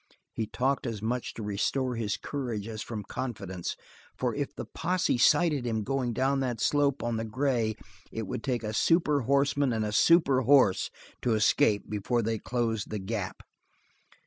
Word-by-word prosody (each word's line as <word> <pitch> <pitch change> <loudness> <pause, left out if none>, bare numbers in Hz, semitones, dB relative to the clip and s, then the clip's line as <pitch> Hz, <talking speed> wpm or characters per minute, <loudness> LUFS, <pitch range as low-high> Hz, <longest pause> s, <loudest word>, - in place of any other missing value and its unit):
He 110 - -2
talked 135 +3 0
as 115 -3 -3
much 120 +4 -3
to 110 - -6
restore 125 +5 -1
his 105 -3 -1
courage 120 -7 -4
as 110 -1 -5
from, 110 -3 -5
confidence, 95 -6 -5 0.4
for - - 0
if - - -2
the - - -5
posse 180 -6 0
sighted 150 0 +4
him 110 -2 -1
going 130 0 -1
down 135 +3 +1
that 125 -4 -2
slope 140 +2 +2
on 120 -1 -1
the 110 - -2
gray 115 -1 0 0.4
it 110 - -4
would 110 - -5
take 125 -4 -1
a 110 0 -3
super 150 +3 +3
horseman 140 +1 +2
and 110 -2 0
a 105 - -2
super 140 +2 +4
horse 125 -6 +4 0.3
to 120 -2 +2
escape 110 -1 +3
before 110 +3 -1
they 110 0 -1
closed 115 -3 -2
the 105 - -3
gap. 100 -1 -4
120 Hz, 175 wpm, -29 LUFS, 110-135 Hz, 0.4 s, sighted